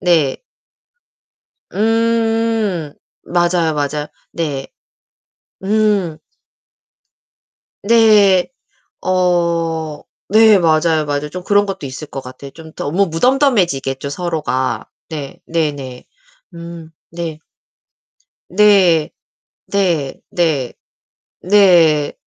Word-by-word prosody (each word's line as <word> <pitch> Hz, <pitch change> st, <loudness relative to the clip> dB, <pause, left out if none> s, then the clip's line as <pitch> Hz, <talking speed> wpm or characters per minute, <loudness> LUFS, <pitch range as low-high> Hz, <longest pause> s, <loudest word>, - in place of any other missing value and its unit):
네. 160 Hz, -6 st, +2 dB, 1.4 s
음. 225 Hz, -6 st, 0 dB, 0.3 s
맞아요, 175 Hz, -2 st, +1 dB
맞아요. 145 Hz, +1 st, -2 dB, 0.2 s
네. 145 Hz, -5 st, -4 dB, 1.0 s
음. 200 Hz, -5 st, +1 dB, 1.6 s
네. 205 Hz, -4 st, +5 dB, 0.5 s
어 170 Hz, -4 st, 0 dB, 0.3 s
네. 215 Hz, -1 st, +6 dB
맞아요, 160 Hz, -1 st, +2 dB
맞아요. 145 Hz, +1 st, -2 dB
좀 180 Hz, +3 st, -7 dB
그런 205 Hz, +1 st, +3 dB
것도 195 Hz, -6 st, -6 dB
있을 135 Hz, +4 st, -8 dB
것 135 Hz, -, -7 dB
같아요. 130 Hz, +2 st, -11 dB
좀 160 Hz, -1 st, -13 dB
더 145 Hz, -, -4 dB
뭐 195 Hz, +5 st, +2 dB
무덤덤해지겠죠, 170 Hz, -, +1 dB
서로가. 150 Hz, -5 st, -2 dB, 0.2 s
네. 145 Hz, -4 st, -7 dB
네네. 145 Hz, -6 st, -3 dB, 0.5 s
음 170 Hz, -1 st, -10 dB, 0.2 s
네. 165 Hz, -2 st, -5 dB, 1.1 s
네. 185 Hz, -5 st, +4 dB, 0.6 s
네. 170 Hz, -9 st, 0 dB, 0.2 s
네. 155 Hz, -8 st, 0 dB, 0.7 s
네. 175 Hz, -7 st, +4 dB
170 Hz, 140 characters per minute, -17 LUFS, 150-200 Hz, 1.6 s, 네